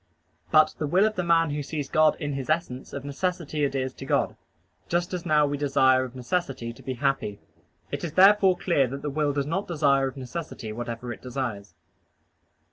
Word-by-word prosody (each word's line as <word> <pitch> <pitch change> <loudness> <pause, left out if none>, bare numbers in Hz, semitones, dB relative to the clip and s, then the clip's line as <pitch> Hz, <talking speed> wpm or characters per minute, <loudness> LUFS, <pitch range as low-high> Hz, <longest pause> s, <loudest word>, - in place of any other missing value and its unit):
But 155 -1 +5
the 150 - -1
will 185 +7 +4
of 215 0 0
the 180 - 0
man 165 -2 +3
who 145 0 -2
sees 145 0 -4
God 155 +2 +4
in 145 -3 -3
His 135 0 -5
essence 155 -5 -2
of 140 -1 -6
necessity 155 0 -2
adheres 135 -2 -1
to - - -9
God, - - +1 0.5
just 175 +2 0
as 180 -1 -4
now 150 -1 +4
we 145 0 -2
desire 130 -2 +4
of 130 0 -8
necessity 130 -3 -3
to - - -16
be 130 - -4
happy. 135 -6 -1 0.5
It - - -4
is 165 -3 -4
therefore 195 0 +6
clear 155 -8 +2
that 140 +3 -7
the 145 - -2
will 150 0 +1
does 140 -1 -1
not 180 +7 -2
desire 140 -5 +2
of 135 - -7
necessity 130 -4 -6
whatever 120 +1 -5
it - - -13
desires. 120 -7 -5
145 Hz, 200 wpm, -26 LUFS, 130-165 Hz, 0.5 s, therefore